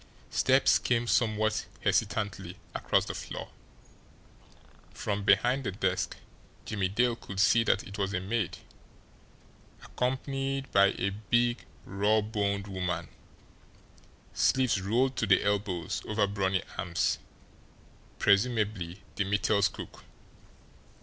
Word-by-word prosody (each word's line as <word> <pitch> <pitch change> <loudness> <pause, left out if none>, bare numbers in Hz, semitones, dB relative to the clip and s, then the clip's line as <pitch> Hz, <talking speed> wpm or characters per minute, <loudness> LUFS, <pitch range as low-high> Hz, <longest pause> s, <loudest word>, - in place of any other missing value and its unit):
Steps 130 +1 +4
came 120 -1 +1
somewhat 110 -2 +1
hesitantly 100 -4 -1 0.2
across - - +1
the - - -4
floor - - -6 1.5
from 100 -1 -2
behind 120 +7 +3
the 110 - -2
desk, 95 -1 -1 0.5
Jimmie 100 -3 -1
Dale 120 +5 +1
could 95 -4 -8
see 115 +3 +5
that 100 - +2
it 100 +2 -9
was 100 -1 0
a 95 - -1
maid, 100 +1 -2 1.3
accompanied 135 +1 -2
by 100 0 +4
a 100 +2 0
big, 120 0 0 0.2
rawboned 105 0 0
woman, 90 -4 -3 1.2
sleeves 130 -7 +2
rolled 125 +7 +1
to 110 - 0
the 95 - +4
elbows 100 -5 -1
over 105 -1 +2
brawny 95 -2 0 0.2
arms, 85 -3 0 1.0
presumably 100 -4 +1
the 100 - +2
Mittels' 100 0 +2
cook. - - -10
105 Hz, 110 wpm, -29 LUFS, 95-115 Hz, 1.5 s, see